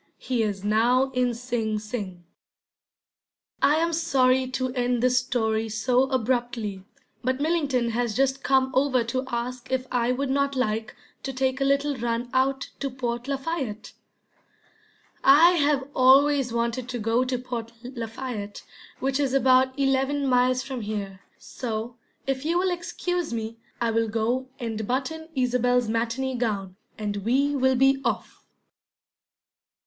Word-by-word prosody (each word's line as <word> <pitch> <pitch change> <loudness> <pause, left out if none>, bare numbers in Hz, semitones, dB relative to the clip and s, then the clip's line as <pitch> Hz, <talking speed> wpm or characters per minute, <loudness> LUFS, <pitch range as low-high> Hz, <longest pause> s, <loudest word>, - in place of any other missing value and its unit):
He 250 -3 -1
is 205 -3 -2
now 240 +5 +3
in 250 -2 0
Sing 230 -3 -2
Sing. 210 -5 -6 1.4
I 295 - +5
am 335 +1 +1
sorry 265 -5 +2
to 255 0 -2
end 245 -1 0
this 250 0 +4
story 225 -3 -1
so 245 +4 +2
abruptly, 240 -5 -1 0.4
but 260 +2 0
Millington 285 -7 +1
has 235 -2 -1
just 270 0 +1
come 265 -1 +2
over 260 -2 +2
to 255 +3 -2
ask 245 +1 -4
if 260 -1 0
I 245 0 +1
would 265 +1 -1
not 280 0 +1
like 220 -3 -1 0.3
to 270 - -4
take 265 +1 -1
a - - +3
little 280 +1 +1
run 235 +1 -2
out 265 +1 +1
to 275 - -2
Port 245 -1 -4
Lafayette. 270 -6 -3 1.3
I 300 +6 +8
have 290 -5 +1
always 270 0 +5
wanted 235 +1 -2
to 250 - -3
go 225 +2 +1
to 255 0 -1
Port 240 -2 -5
Lafayette, 230 -3 -6 0.4
which 270 +1 0
is 275 -2 +1
about 260 0 +4
eleven 275 +1 +1
miles 255 0 +3
from 265 -2 -5
here; 205 -3 -4 0.2
so, 230 -1 -5 0.3
if 270 0 -2
you 335 +3 +1
will 370 +1 +1
excuse 355 -1 -3
me, 225 0 -4 0.2
I 235 -1 +1
will 225 0 +1
go 230 +4 -1
and 225 -4 -4
button 320 +6 -2
Isobel's 250 -1 +2
matinee 235 +4 -1
gown, 200 -6 -2 0.2
and 205 -1 -3
we 265 +8 +1
will 260 -1 +3
be 270 +1 +3
off. - - -3
255 Hz, 145 wpm, -25 LUFS, 230-270 Hz, 1.4 s, I